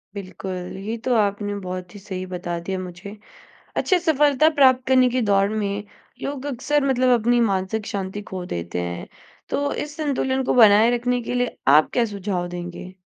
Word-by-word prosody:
बिल्कुल। 185 -2 -6
ये 225 +2 -3
तो 255 - +2
आपने 205 -1 0
बहुत 185 -1 -6
ही - - -8
सही 185 -1 -6
बता 175 -1 -3
दिया 185 +2 -4
मुझे। 185 +3 -8 0.6
अच्छा 370 - +3
सफलता 295 -1 +4
प्राप्त 260 -3 +5
करने 255 -1 +5
की 255 +1 0
दौड़ 200 -2 +3
में 205 -1 -2 0.4
लोग 280 -1 -4
अक्सर 285 +2 0
मतलब 255 -2 +3
अपनी 240 +2 +2
मानसिक 195 +3 -2
शांति 195 0 -4
खो 185 -1 -4
देते 85 - -4
हैं 85 0 -5 0.4
तो 285 0 -1
इस 295 0 -11
संतुलन 265 -3 0
को - - 0
बनाए 220 -1 +7
रखने 245 +1 -1
के 235 - -4
लिए 245 0 -1 0.2
आप 155 - +3
क्या 240 - +3
सुझाव 195 -4 -3
देंगे? 175 +1 -7
205 Hz, 175 wpm, -22 LUFS, 185-255 Hz, 0.6 s, बनाए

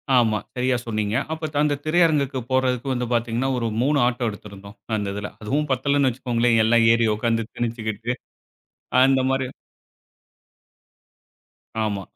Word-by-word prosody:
ஆமா. 110 -3 +3 0.2
சரிய 125 +1 +1
சொன்னீங்க. 110 -1 -1 0.2
அப்போ 160 0 -3 0.2
அந்த 150 -1 +2
திரையரங்குக்கு 155 -5 +2
போறதுக்கு 130 0 +1
வந்து 125 -1 -2
பார்த்தீங்கன்னா, 120 +2 0
ஒரு 115 - -1
3 145 +3 +2
ஆட்டோ 120 -1 -1
எடுத்திருந்தோம். 100 -1 -11 0.2
அந்த 100 -1 -3
இதில. 105 0 -5
அதுவும் 145 +8 -1
பத்தலன்னு 140 +1 +2
வச்சிக்கோங்களேன், 120 -2 +1
எல்லாம் 115 0 +4
ஏறி 115 -1 +2
உட்கார்ந்து 115 0 0
திணிச்சிக்கிட்டு, 115 -1 -3 0.9
அந்தமாரி. 130 0 +2 2.4
ஆமா. 100 -2 -2
120 Hz, 120 wpm, -23 LUFS, 110-135 Hz, 2.4 s, எல்லாம்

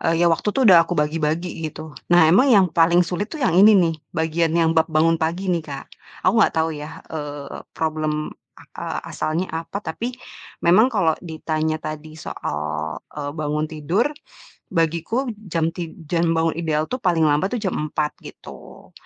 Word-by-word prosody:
eee, 165 +1 +2
ya 170 - +5
waktu 165 +5 0
tuh 270 - +2
udah 170 -2 +7
aku 175 - -2
bagi-bagi 155 +2 0 0.2
gitu. 155 0 -9 0.2
Nah 160 -2 +6
emang 250 +11 +5
yang 200 -5 +6
paling 170 +2 +4
sulit 180 +4 -3
tuh 310 -4 -7
yang 175 -5 +3
ini 210 +2 +8
nih, 170 -4 +3 0.2
bagian 160 0 0
yang 165 -1 +3
bab 160 -1 +3
bangun 160 +1 +2
pagi 175 +4 -1
nih, 170 -2 0
Kak. 140 -2 -6 0.4
Aku 230 - +3
gak 215 - +4
tau 160 0 +1
ya, 150 +1 -8
eee, 145 -2 -6 0.2
problem, 155 -1 -2 0.5
eee, - - -3
asalnya 165 +4 -2
apa 165 +5 -4
tapi 205 +9 -4 0.5
memang 195 +8 +6
kalau 165 -6 +3
ditanya 160 -1 -2
tadi 155 0 -7
soal, 75 - -4 0.2
eee, 145 0 -3
bangun 150 0 -1
tidur, 165 - 0 0.7
bagiku 170 - 0 0.2
jam 165 -1 +1
tid 170 -2 -6
jam 170 -1 +1
bangun 160 0 +2
ideal 155 -2 0
tuh - - +1
paling 170 -5 +2
lambat 150 +6 +2
tuh - - -4
jam 190 - 0 0.2
4.00 150 0 -1
gitu, - - -13
165 Hz, 175 wpm, -22 LUFS, 155-175 Hz, 0.7 s, ini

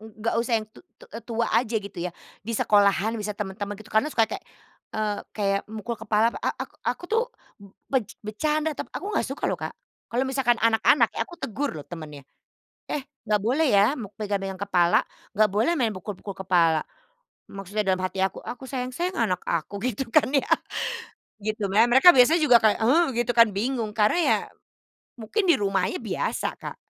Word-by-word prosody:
nggak 220 +1 -4
usah 235 0 0
yang 215 - -2
tu - - -15 0.2
tu - - -16 0.2
tua 230 0 -1
aja 235 -2 +2
gitu 200 -4 -5
ya, 180 - -2 0.3
di 230 +4 -5
sekolahan 205 +1 +3
misal 210 -2 -4
temen-temen 205 0 -4
gitu 215 +1 -14
karena 220 +7 +3
suka 230 -6 +3
kayak, 220 - -6 0.5
eee, 215 -1 -2 0.2
kayak 200 -1 +1
mukul 220 +2 -5
kepala, 225 +1 +2
a - - 0
a - - -3 0.2
aku - - -3
tuh 445 +5 +1 0.7
bec 245 -6 +1 0.2
becanda 305 +8 -1
toh, - - -6
aku - - -7
nggak - - +2
suka 280 +3 -5
loh, - - -1
Kak. - - -5 0.3
Kalau 250 +3 0
misalkan 265 -3 +1
anak-anak, 230 +2 +3
ya - - -5
aku 345 - -11
tegur 280 - -3
loh 150 - -8
temennya, 150 -5 -9 0.7
"Eh 285 -2 -3 0.2
nggak 210 - +4
boleh 255 +10 +1
ya 205 +6 +4
me 220 -9 -7
pegang-pegang 195 -2 -3
kepala, 180 -3 +3 0.3
nggak 215 +1 +3
boleh 220 +8 +2
main 225 -4 +1
pukul-pukul 195 +1 -7
kepala". 170 -4 +3 0.7
Maksudnya 195 +2 -3
dalam 190 -2 +1
hati 185 +1 -1
aku, 190 - -1
"Aku 250 - -8
sayang 255 -1 -4
sayang 360 +4 -2
anak 180 -2 -2
aku," 170 +3 -2
gitu 255 +1 -2
kan 245 +3 +3
ya 275 -2 +1 1.0
gitu. 215 -1 -2
Mem 220 +5 +4
mereka 270 +7 +8
biasanya 280 +7 +6
juga 250 -8 +5
kayak, 215 -1 +4
heh, 270 +10 +4
gitu 240 0 0
kan, 230 -3 +6
bingung 225 +2 -2
karena 210 +7 +2
ya - - +4 0.8
mungkin 360 - -2
di 340 - +6
rumahnya 195 - 0
biasa, - - -2
Kak, - - -7
220 Hz, 185 wpm, -25 LUFS, 200-250 Hz, 1.0 s, mereka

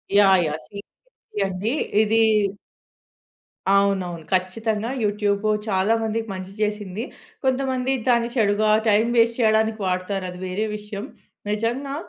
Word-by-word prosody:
Yeah! 195 -2 +6
Yeah! 150 +1 -3
Seriously 200 +2 -9 0.6
అండి. 195 +5 -2 0.3
ఇది 225 +1 +3 1.5
అవునవును. 190 -4 +1
ఖచ్చితంగా 215 +4 -1
యూట్యూబు 205 0 0 0.2
చాలా 195 +2 +2
మందికి 225 +1 -2
మంచి 185 0 -7
చేసింది. 210 0 -2 0.4
కొంతమంది 260 0 +1
దాన్ని 235 -1 +3
చెడుగా 215 -1 +2 0.2
టైం 210 +2 +4
వేస్ట్ 230 +1 +3
చేయడానికి 220 -1 +2
వాడుతారది 185 0 -3
వేరే 200 +4 -1
విషయం. 210 0 -7 0.5
నిజంగా 240 +6 -2
210 Hz, 110 wpm, -23 LUFS, 195-225 Hz, 1.5 s, Yeah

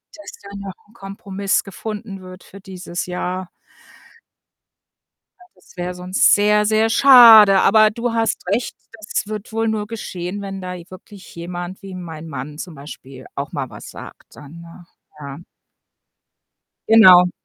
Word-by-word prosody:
dass 310 - -11
da 200 - -12
noch 200 -1 -8 0.2
'n - - -23
Kompromiss 195 -2 -3
gefunden 205 0 -8
wird 185 0 -13
für 195 - -15
dieses 185 -2 -7
Jahr. 180 0 -5 1.9
Ja, 360 - -18
das - - -23
wäre 180 0 -5
sonst 180 +1 +2
sehr, 210 +1 +2
sehr 220 +1 +2
schade. 225 -7 +8
Aber 215 +1 +5
du 235 +2 -4
hast 225 -4 -2
recht, 220 +6 -2 0.2
das 220 -1 -5
wird 215 0 -7
wohl 225 0 -1
nur 215 -1 -2
geschehen, 200 -3 -7
wenn 195 -1 -7
da 180 0 -6
j 175 0 -12
wirklich 190 +1 -14
jemand 175 +2 -7
wie 195 -1 -10
mein 165 -3 -9
Mann 145 0 -8
zum 175 0 -8
Beispiel 140 -2 -12
auch 140 +2 -6
mal 135 -3 -5
was - - -11
sagt - - -14
dann, 150 +3 -13
ne? 170 +1 -15 0.3
Ja. 140 0 -9 1.5
Genau. 185 -5 +7
190 Hz, 150 wpm, -19 LUFS, 175-215 Hz, 1.9 s, schade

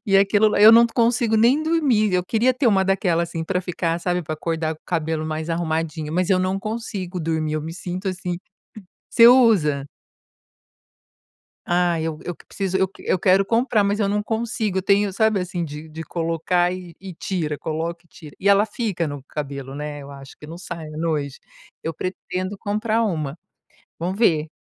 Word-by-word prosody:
e 195 - +4
aquilo 205 +2 +4
eu 215 +2 +9
não 235 +1 +7
consigo 230 -1 +1
nem 245 +7 +4
dormir. 280 - +2
Eu 180 0 +1
queria 235 +6 +2
ter 255 +1 0
uma 195 -4 +4
daquela, 185 -3 +1
assim, 170 -1 -4
pra 180 +2 -1
ficar, 170 -2 -2
sabe, 180 0 -1
pra 155 0 -4
acordar 160 0 -2
com 155 - -22
o - - -
cabelo 160 -2 -1
mais 155 +1 -3
arrumadinho, 160 -2 -2
mas 180 +2 0
eu 185 - +4
não 185 +1 0
consigo 200 -4 -5
dormir. 160 -1 -1
Eu 155 - -2
me 160 +2 -6
sinto 180 +2 -5
assim 180 -1 -3 0.7
você 230 -1 +7
usa? 195 - +4 1.8
Ah, 175 -1 +2
eu 160 -1 -3
eu 175 - -4
preciso, 190 -2 -3
eu 190 0 +2
eu - - 0
quero 190 +2 +4
comprar, 230 0 +2
mas 200 +1 0
eu 205 - +1
não 210 +1 0
consigo. 220 -3 -2
Tenho, 200 +1 +3
sabe, 220 -1 +2
assim, 180 -1 -3
de 150 +1 -8
de 160 +1 -7
colocar 170 +2 0
e 180 -2 -7
e 190 -2 -8
tira, 160 -4 -3
coloca 165 +3 -4
e - - -28
tira, 150 -3 -13
e 200 - 0
ela 200 +1 +5
fica 205 -7 -2
no 145 -1 -6
cabelo, 140 -1 -6
né. 145 0 -6
Eu 140 - -11
acho 135 0 -12
que 150 - -12
não 165 +3 -9
sai 165 -3 -7
à - - -9
noite. 150 -4 -2 0.4
Eu 165 -1 -3
pretendo 185 +2 -4
comprar 215 +2 0
uma, 160 -7 -2 0.6
vamos 180 +4 -3
ver. 160 -9 +3
180 Hz, 190 wpm, -22 LUFS, 160-205 Hz, 1.8 s, eu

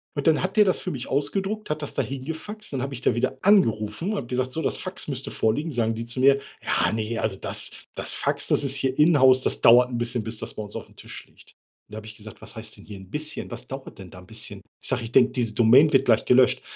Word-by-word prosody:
Und 145 - -2
dann 160 +1 +3
hat 190 +3 -3
der 210 - +7
das 185 - +1
für 185 - -4
mich 130 -5 -6
ausgedruckt, 195 +10 -2
hat 150 0 -2
das 145 - -5
da - - 0
hingefaxt. 160 +9 -6
Dann 130 - -2
habe 135 +1 -4
ich 125 - -6
da - - +2
wieder 130 +2 -1
angerufen 115 - +2
und 215 - -2
habe 120 - -5
gesagt: 130 +1 -2
„So, 160 - -3
das - - -1
Fax 185 -3 -6
müsste 135 -2 -4
vorliegen.“ 150 +9 0
Sagen 115 -3 0
die 115 - -5
zu 120 +2 -4
mir: 135 +1 +5 0.2
„Ja - - +1
ne, 110 +1 -3
also, 95 -3 -2
das - - -2 0.2
das - - -2
Fax, - - -1
das - - +2
ist 135 -1 0
hier 135 -1 -1
inhouse, 130 -5 +5
das - - -1
dauert 120 +2 +6
'n 120 - -3
bisschen, 120 -1 -2
bis 110 0 -4
das - - -5
bei 110 - -6
uns 105 - -9
aufm - - -9
Tisch - - -10
liegt.“ - - -20 0.4
Und - - -19
da - - -6
habe 110 0 -9
ich 110 - -10
gesagt: 110 -1 -12
„Was - - -9
heißt - - -6
denn - - -15
hier 105 - -9
'n 95 0 -14
bisschen? 155 +3 -4
Was 120 - -6
dauert 135 -5 -9
denn 95 -2 -10
da 90 - -13
'n 90 - -16
bisschen?“ 110 -2 -3 0.2
Ich - - -3
sage: 125 -3 -1
„Ich 115 - -7
denke, 125 0 +5
diese 120 -4 -1
Domain 125 +7 +5
wird 135 - +4
gleich 115 -2 +3
gelöscht.“ 125 0 +4
130 Hz, 275 wpm, -24 LUFS, 115-150 Hz, 0.4 s, der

